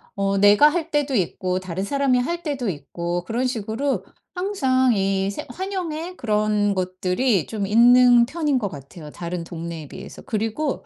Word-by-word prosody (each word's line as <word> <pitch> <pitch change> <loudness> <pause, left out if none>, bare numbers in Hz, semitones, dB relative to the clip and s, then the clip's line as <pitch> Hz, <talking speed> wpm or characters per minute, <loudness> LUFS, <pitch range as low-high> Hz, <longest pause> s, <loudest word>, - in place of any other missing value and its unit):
어 195 0 0
내가 205 +8 +6
할 330 +1 -1
때도 290 -2 0
있고 185 -1 -1
다른 185 +1 -4
사람이 275 +1 +1
할 340 +7 -2
때도 275 -6 -3
있고 170 +3 -4
그런 240 +7 -1
식으로 240 +4 -2 0.3
항상 265 -10 +1
이 195 -1 0
새 - - -6
환영의 360 +1 -5
그런 210 -2 +1
것들이 185 - 0
좀 210 -3 -3
있는 240 +3 +6
편인 295 -1 0
것 210 - -2
같아요. 150 +1 -11
다른 170 +1 -5
동네에 165 -2 -7
비해서. - - -10
그리고 225 +5 -2
220 Hz, 305 characters per minute, -22 LUFS, 185-275 Hz, 0.3 s, 내가